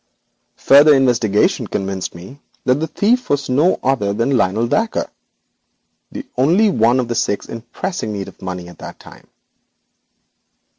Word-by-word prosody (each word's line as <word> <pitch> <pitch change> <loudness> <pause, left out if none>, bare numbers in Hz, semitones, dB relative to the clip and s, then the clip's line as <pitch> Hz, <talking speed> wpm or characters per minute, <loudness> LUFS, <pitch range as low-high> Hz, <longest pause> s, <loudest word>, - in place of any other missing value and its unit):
Further 145 +2 +6
investigation 120 -6 +1
convinced 95 -2 -4
me 95 +12 -12 0.2
that 130 +2 +2
the 160 - -2
thief 240 +9 0
was 145 -1 -1
no 150 +8 +2
other 120 -7 0
than 115 +6 0
Lionel 110 0 +1
Dacre, 220 - -1 1.0
the - - -7
only 180 +11 +3
one 120 -2 +2
of 125 - -1
the 120 - -2
six 115 -3 -2
in 115 - -7
pressing 120 - -5
need 100 -2 -5
of - - -14
money 90 -2 -6
at 90 - -14
this - - -9
time. - - -16
125 Hz, 150 wpm, -18 LUFS, 100-145 Hz, 1.0 s, Further